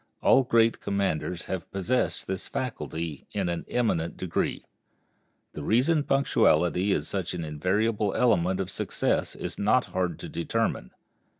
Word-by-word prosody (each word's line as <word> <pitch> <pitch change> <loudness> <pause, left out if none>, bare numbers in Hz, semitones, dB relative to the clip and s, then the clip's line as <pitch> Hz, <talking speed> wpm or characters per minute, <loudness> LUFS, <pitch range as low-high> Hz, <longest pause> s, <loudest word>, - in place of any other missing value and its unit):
All 135 - +6
great 115 -2 +3
commanders 95 -3 -1
have 95 -2 -5
possessed 105 +7 0
this 95 0 -4
faculty 85 - -4
in 95 -4 -1
an 85 -1 -3
eminent 95 -9 0
degree. 90 -3 -2 0.9
The - - -6
reason 130 - +3
punctuality 95 - +2
is - - 0
such 95 -3 -3
an 85 -2 -4
invariable 100 +7 0
element 95 -6 +2
of 95 -1 -3
success - - -1
is - - -5
not 110 +5 +3
hard 90 -1 -1
to - - -6
determine. - - -1
95 Hz, 135 wpm, -27 LUFS, 85-115 Hz, 0.9 s, All